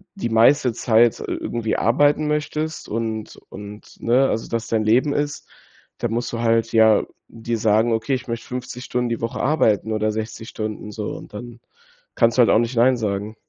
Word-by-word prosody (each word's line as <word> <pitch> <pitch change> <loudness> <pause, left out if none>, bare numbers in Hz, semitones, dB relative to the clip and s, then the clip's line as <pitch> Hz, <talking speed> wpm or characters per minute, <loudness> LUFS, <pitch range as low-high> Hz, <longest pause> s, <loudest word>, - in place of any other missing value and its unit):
die 185 -12 -3
meiste 120 +2 +4
Zeit, 115 -1 +3
äh, - - -5
irgendwie 115 -2 -2
arbeiten 145 +6 +2
möchtest 150 +1 -3
und 110 -1 -4
und 105 +1 -11
ne, 125 +3 +3
also, 115 - -3
das 115 -1 -3
dein 110 -1 0
Leben 125 +7 +3
ist, 145 0 -3 0.5
da 120 - -1
musst 120 +2 -3
du 115 - -3
halt 115 0 +1
ja 110 -2 +5 0.3
dir 115 +1 -4
sagen: 110 +2 +2
„Okay, 115 +5 -1
ich 125 - -7
möchte 115 0 -4
50 125 0 -6
Stunden 125 0 -1
die 115 - -3
Woche 115 - -3
arbeiten 110 -7 +1
oder 110 0 0
60 110 +1 -6
Stunden 105 -1 -5
so“, 105 0 -5
und - - -13
dann 120 +2 -9 0.6
kannst 115 0 +2
du 125 - +7
halt 115 - +5
auch - - +5
nicht 120 +2 -2
Nein 125 +2 +5
sagen. 105 -1 -3
115 Hz, 190 wpm, -21 LUFS, 110-125 Hz, 0.6 s, du